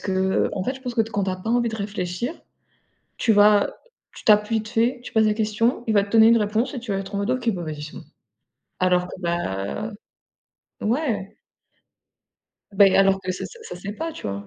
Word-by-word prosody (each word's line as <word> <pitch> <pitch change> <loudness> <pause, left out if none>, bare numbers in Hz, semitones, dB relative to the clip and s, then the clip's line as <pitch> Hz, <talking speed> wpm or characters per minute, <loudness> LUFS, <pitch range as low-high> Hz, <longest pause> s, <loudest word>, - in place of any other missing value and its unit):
qu'en 190 0 0
fait, 260 - -1
je 265 - -11
pense 250 -2 -5
que 230 - +3
quand 210 -3 -2
tu 190 - -1
as 185 - -3
pas 185 +5 -5
envie 240 0 +2
de 220 - -5
réfléchir, 200 - -3 0.8
tu 225 - +2
vas 205 0 +4 0.4
tu - - -13
tapes 210 0 +5
vite 220 -1 -1
fait, 240 +3 +1
tu - - -9
poses 220 -1 +4
la 210 - +2
question, 225 +3 0
il 220 - +1
va 200 - +5
te 200 - -7
donner 225 0 +6
une 230 - +6
réponse 220 +5 0
et 255 - -4
tu 230 -3 -7
vas 195 - 0
être 195 +1 -7
en 200 - 0
mode 200 - -1
«OK, 255 -2 -1
bah, 180 -3 -5
vas-y, 155 -2 -6
c'est 150 - -8
bon», - - -8 0.8
alors 180 -1 +2
que, 180 - -9
bah 170 - -3 0.9
ouais. 220 -5 -1 1.4
Bah 200 0 +6
et 195 - +3
alors 195 0 +4
que 185 0 -3
ça - - -6
ça, 470 - -13
ça 445 - -8
sait 200 +3 -6
pas, 325 +7 -5
tu - - -8
vois? 100 0 -5
210 Hz, 225 wpm, -23 LUFS, 190-230 Hz, 1.4 s, donner